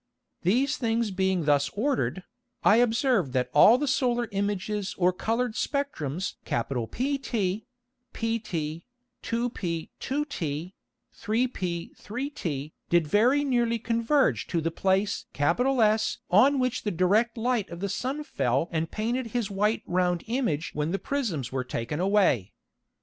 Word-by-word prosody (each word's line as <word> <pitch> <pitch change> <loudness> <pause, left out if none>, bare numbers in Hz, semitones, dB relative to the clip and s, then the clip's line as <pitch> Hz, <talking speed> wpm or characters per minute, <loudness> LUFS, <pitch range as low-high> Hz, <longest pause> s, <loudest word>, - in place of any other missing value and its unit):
These 250 +10 +2
things 230 -2 0
being 190 -3 0
thus 145 -1 +3
ordered, 205 - 0 0.4
I 210 - +6
observed 235 - +2
that 125 -1 0
all 215 +11 +8
the 295 +2 -1
solar 245 -3 +1
Images 200 0 -2
or 180 0 +3
coloured 230 +5 -1
Spectrums 190 - -2
PT, 205 - -2 0.5
pt, 170 -9 -3 0.4
2p 225 -9 -2
2t, 185 - -3 0.5
3p 205 -7 -2
3t 185 - -4 0.2
did 170 -2 +3
very 240 - +3
nearly 240 -4 +1
converge 230 +5 +1
to 170 - 0
the 165 +1 -1
place 195 +4 0
S 220 - +2
on 260 +10 +6
which 255 -1 0
the 210 - -1
direct 205 +7 +2
Light 235 -3 0
of 170 - -8
the 200 - -2
Sun 260 +9 -3
fell 135 - 0
and 160 -1 -1
painted 235 +3 -2
his 230 -2 -2
white 210 +3 +1
round 180 -1 0
Image 225 - -1
when 150 +1 -1
the 195 - 0
Prisms 200 - -2
were 130 -1 -1
taken 125 +4 -4
away. 185 - +2
205 Hz, 130 wpm, -27 LUFS, 170-240 Hz, 0.5 s, all